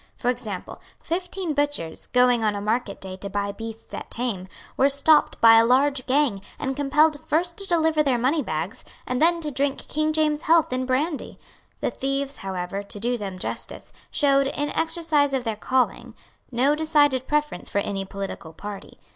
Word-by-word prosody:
For 245 - -1
example, 220 -7 -7 0.2
fifteen 360 -1 -2
butchers, 290 - -2
going 250 -2 +3
on 210 -1 +1
a - - -3
market 215 0 -1
day 185 -1 -7
to 200 +1 -6
buy 200 0 -2
beasts 225 +1 -9
at - - -6
Thame, 225 -6 -3 0.3
were 275 - +4
stopped 280 +2 +3
by 225 0 +8
a - - +5
large 260 +2 +2
gang, 260 -7 +2 0.2
and 270 -2 -3
compelled 295 +2 +3
first 340 +3 +1
to 395 - +1
deliver 320 -3 +3
their 270 -4 +2
moneybags, 235 - -1 0.2
and 250 +2 -2
then 340 +1 +4
to 300 -2 -3
drink 275 +1 -1
King 310 +1 0
James's 305 -1 +1
health 325 -4 +4
in 255 0 -1
brandy. 290 +4 -1 0.4
The - - 0
thieves, 275 +1 -2
however, 190 0 -4
to 205 0 -7
do 240 +3 0
them 200 -5 -5
justice, - - -5 0.2
showed, 275 -2 +3
in 290 +1 -2
the - - -2
exercise 320 -4 +1
of 260 - -1
their 225 -2 -2
calling, 255 +4 -1 0.4
no 260 +4 +3
decided 295 -4 +2
preference 300 0 -1
for - - -3
any 200 -1 -1
political 195 -4 -7
party. 205 +4 -9
265 Hz, 180 wpm, -24 LUFS, 215-300 Hz, 0.4 s, by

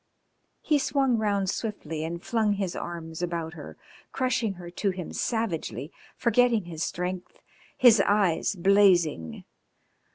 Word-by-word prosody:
He 300 -2 +2
swung 270 -3 +1
round 200 -2 0
swiftly 165 -7 -4
and 170 +2 -5
flung 220 -3 +1
his 195 -3 -3
arms 165 -1 -6
about 170 -2 -3
her, 155 -4 -10 0.3
crushing 250 -5 0
her 175 -2 -10
to 200 +3 -1
him 185 -2 -5
savagely, 185 - -2 0.3
forgetting 235 -4 +3
his 165 -2 -5
strength, 180 +1 -4 0.4
his 230 -5 +7
eyes 200 -2 +2
blazing. 175 - +3
190 Hz, 125 wpm, -27 LUFS, 170-225 Hz, 0.4 s, his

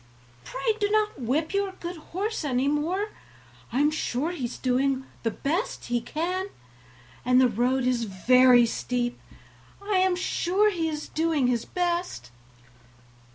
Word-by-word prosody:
pray 275 - -1
do 410 -1 +1
not 425 -7 +1
whip 295 - 0
your 395 -1 0
good 355 -1 -6
horse 385 +6 -4
any 265 -2 0
more; 335 +8 0 0.6
I 250 - 0
am 295 +1 +4
sure 305 0 -1
he 310 -8 -4
is 240 - -5
doing 265 +1 0 0.2
all 275 - 0 0.2
he 240 -1 -1
can, 350 +9 -2 0.8
and 250 +1 +4
the 260 - +6
road 245 +3 +1
is 245 -2 +1
very 245 +5 +5
steep; 240 +1 -2 0.6
I 400 -1 0
am 375 -1 +3
sure 375 +3 +1
he 330 -4 -1
is 300 -1 -5
doing 315 -4 +1
his 240 -2 +1
best." 345 - -2
295 Hz, 145 wpm, -26 LUFS, 250-360 Hz, 0.8 s, the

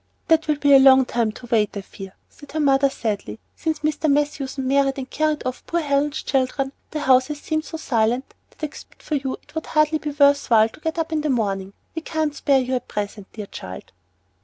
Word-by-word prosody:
"That 325 -1 +4
will 300 - +2
be 285 -1 +3
a 270 - +9
long 265 -1 +7
time 235 -3 0
to 245 - -11
wait, 215 -3 +1
I - - -3
fear," 195 0 -11
said 290 -2 -15
her 315 - -1
mother, 275 -1 +4
sadly. 205 - -4 0.2
"Since 315 -2 -2
Mr. 310 +1 0
Matthewson 280 -2 -1
married 275 0 +2
and 265 -1 -5
carried 310 +2 -1
off 255 0 -4
poor 340 0 0
Helen's 290 +1 0
children, 270 0 0 0.2
the 305 - -4
house 260 -2 +4
has 300 -1 -5
seemed 310 +1 -2
so 320 - -6
silent 240 -3 0 0.2
that - - -21
except 295 - -12
for - - -5
you 270 -2 -1
it - - -22
would 320 0 -4
hardly 305 0 +2
be 300 - -4
worth 285 -1 +3
while 220 -1 +5
to - - -16
get 320 +1 -3
up 325 0 -2
in 310 -1 0
the 300 - -1
morning. 200 -6 -1 0.2
We 325 - -4
can't 315 -2 -1
spare 280 -1 +2
you 255 +1 -3
at 250 - -2
present, 205 -1 -5
dear 210 -2 -6
child." 95 - -9
275 Hz, 225 wpm, -22 LUFS, 245-305 Hz, 0.2 s, a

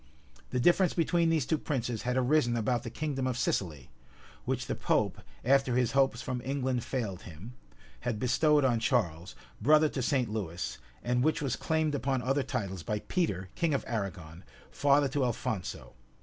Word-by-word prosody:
[*] 65 -1 -27
The 125 - -1
difference 175 +5 +4
between 170 0 +2
these 160 -5 +2
two 160 +1 0
princes 120 -6 -2
had 125 +1 -1
arisen 125 -2 +2
about 120 +1 0
the 115 - -6
kingdom 135 +1 -2
of 125 -2 -1
Sicily, 80 - -2 0.5
which - - -1
the - - -2
pope, - - 0 0.2
after 135 -1 +3
his 125 -2 +2
hopes 135 -3 +2
from 125 -1 -3
England 130 -3 -1
failed 110 -9 -3
him, 90 +9 -10 0.5
had 120 -3 -2
bestowed 145 +5 +3
on 120 -3 +2
Charles, 95 -7 0 0.3
brother 150 +5 +5
to 135 - -3
St. 125 -1 +1
Lewis, 95 -5 -4 0.2
and 125 0 +1
which 155 +1 +2
was 135 -4 -1
claimed 160 -2 0
upon 135 -2 -1
other 135 +2 +1
titles 110 - -3
by 105 +7 -2
Peter, 100 - -1
king 160 -4 +1
of - - -2
Arragon, 95 -6 -5 0.3
father 140 0 +3
to 135 +1 0
Alphonso. 110 -5 -3
125 Hz, 175 wpm, -30 LUFS, 110-140 Hz, 0.5 s, brother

